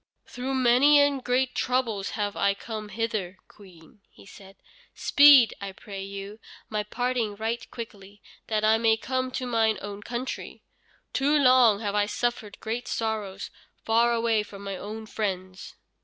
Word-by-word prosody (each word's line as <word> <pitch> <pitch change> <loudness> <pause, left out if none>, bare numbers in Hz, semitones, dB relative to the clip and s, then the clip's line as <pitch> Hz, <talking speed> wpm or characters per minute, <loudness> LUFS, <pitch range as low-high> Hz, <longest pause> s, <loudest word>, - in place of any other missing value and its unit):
"Through 260 +2 -4
many 260 +4 +5
and 285 -2 +2
great 250 +1 +1
troubles 235 -6 -1
have 205 -1 -2
I 200 0 +1
come 215 0 -7
hither, 210 -4 -3
Queen," 185 -1 -18 0.2
said 195 -1 -14
he; - - -41 0.4
"speed, 285 -5 +7
I 195 -1 -6
pray 195 0 -9
you, 200 +2 -8 0.3
my 215 -1 -1
parting 235 0 -2
right 225 +3 -4
quickly, 205 -3 -10 0.3
that 215 -1 0
I 220 +1 +4
may 225 -1 +3
come 255 +2 -2
to 255 - -3
mine 225 -3 +1
own 205 0 -7
country. 240 +4 -6 0.5
Too 285 +2 +2
long 250 -6 +5
have 205 -2 -2
I 205 0 +1
suffered 225 -2 -3
great 230 +3 -4
sorrows 210 -4 -3 0.3
far 230 +1 +3
away 230 -2 +1
from 200 -1 -10
my 195 -1 -4
own 215 +3 -7
friends." 190 -3 -5
220 Hz, 155 wpm, -26 LUFS, 200-245 Hz, 0.5 s, speed